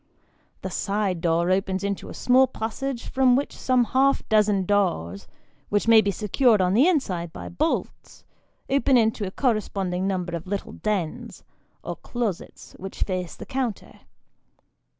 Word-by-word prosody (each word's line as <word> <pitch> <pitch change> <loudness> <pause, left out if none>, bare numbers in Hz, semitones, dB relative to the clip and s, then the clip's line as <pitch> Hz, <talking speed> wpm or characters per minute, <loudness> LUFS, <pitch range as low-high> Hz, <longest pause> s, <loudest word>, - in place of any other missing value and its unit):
The - - -4
side 200 -4 -1
door 170 +1 +1
opens 190 0 0
into 200 -1 -3
a - - -8
small 255 +1 +4
passage 245 +2 -4
from 260 -2 +3
which 280 +2 -2
some 255 -1 +2
half 270 +3 +1
dozen 210 -3 +3
doors 100 - 0 0.4
(which 205 +2 0
may 225 -1 +8
be 200 - -1
secured 215 +3 +2
on 185 0 +2
the 255 - +5
inside 185 - 0
by - - -8
bolts) 310 - -3 0.4
open 270 -1 +3
into 220 -3 +1
a - - -3
corresponding 195 -5 -1
number 180 -3 -2
of 170 +2 -7
little 200 +1 -4
dens, 195 -7 -4 0.4
or - - -5
closets, 230 -7 -5
which 190 +1 -4
face 185 -3 -4
the - - -9
counter. 255 -5 -4
205 Hz, 150 wpm, -24 LUFS, 185-245 Hz, 0.4 s, may